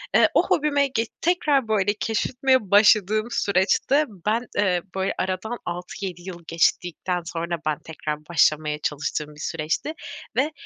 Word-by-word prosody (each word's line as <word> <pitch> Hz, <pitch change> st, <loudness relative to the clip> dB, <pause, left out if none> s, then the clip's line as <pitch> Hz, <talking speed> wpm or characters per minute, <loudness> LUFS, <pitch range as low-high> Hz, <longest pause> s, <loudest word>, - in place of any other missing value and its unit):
eee, -, -, +6 dB
o -, -, +3 dB
hobime 285 Hz, -2 st, +2 dB
ge 230 Hz, -3 st, -1 dB, 0.2 s
tekrar, 300 Hz, -7 st, +2 dB
böyle, 205 Hz, -2 st, +2 dB
keşfetmeye 250 Hz, -1 st, +1 dB
başladığım 215 Hz, +1 st, +5 dB
süreçte 205 Hz, +11 st, +2 dB, 0.2 s
ben, 230 Hz, +4 st, 0 dB
eee, 185 Hz, -4 st, +2 dB
böyle, 190 Hz, 0 st, 0 dB
aradan 190 Hz, +6 st, -2 dB
6-7 180 Hz, +1 st, -5 dB
yıl 175 Hz, -2 st, -9 dB
geçtikten 175 Hz, +1 st, 0 dB
sonra 170 Hz, +1 st, -3 dB
ben 155 Hz, -1 st, 0 dB
tekrar 155 Hz, -1 st, -5 dB
başlamaya 155 Hz, -2 st, +2 dB
çalıştığım 150 Hz, +1 st, -3 dB
bir 150 Hz, -, -15 dB
süreçti 160 Hz, -, -2 dB, 0.4 s
ve 285 Hz, +4 st, +1 dB
190 Hz, 135 wpm, -24 LUFS, 170-235 Hz, 0.4 s, eee